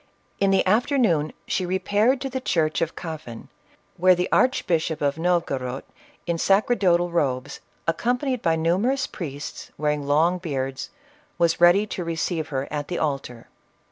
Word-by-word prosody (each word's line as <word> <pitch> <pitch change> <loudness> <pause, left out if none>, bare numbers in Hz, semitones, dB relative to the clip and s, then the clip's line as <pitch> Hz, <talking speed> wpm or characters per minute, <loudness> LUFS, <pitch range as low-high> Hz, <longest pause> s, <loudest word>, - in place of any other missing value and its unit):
In 195 - +3
the 195 0 +3
afternoon 210 - +2
she 185 - -1
repaired 205 +8 +1
to 270 - -3
the 260 0 -3
church 155 -9 0
of 165 -1 -1
Kafan, 155 -9 -8 0.5
where 185 +1 +5
the 180 +1 -1
Archbishop 165 - +1
of 145 +2 -1
No 175 +1 +3
vogorod, 130 -5 -4 0.4
in 170 -1 -1
sacerdotal 190 -4 +2
robes, 135 -5 -1 0.3
accompanied 245 - 0
by 165 -1 +2
numerous 195 +12 +1
priests, 145 -4 -7
wearing 150 -1 -1
long 165 +5 +3
beards, 135 -6 -4 0.5
was 170 0 +1
ready 175 +4 +6
to 190 -3 -5
receive 165 -1 -2
her 135 -1 -3
at 145 -1 -3
the 175 - -3
altar. 135 -6 -3
170 Hz, 145 wpm, -24 LUFS, 150-195 Hz, 0.5 s, ready